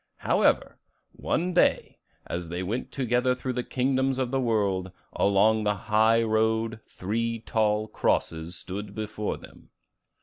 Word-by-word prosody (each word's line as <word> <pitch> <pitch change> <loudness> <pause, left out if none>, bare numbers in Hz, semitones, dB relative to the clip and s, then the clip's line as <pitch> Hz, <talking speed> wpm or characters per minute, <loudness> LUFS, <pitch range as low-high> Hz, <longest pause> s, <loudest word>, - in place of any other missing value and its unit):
However, - - +1 0.3
one 180 +2 -1
day, 175 - +2 0.3
as 85 -1 -4
they 90 +2 -3
went 110 +7 -3
together 125 -1 +1
through 130 0 -4
the 125 0 -2
kingdoms 130 +1 0
of 130 -2 -1
the 135 -1 +1
world, 100 -6 0 0.2
along 105 +2 +3
the 105 0 +1
high 110 +3 +3
road 110 0 +1
three 115 +4 -2
tall 110 -2 +1
crosses 80 -4 -1
stood 100 +3 -6
before 105 -1 -3
them. - - -16
110 Hz, 135 wpm, -27 LUFS, 100-125 Hz, 0.3 s, along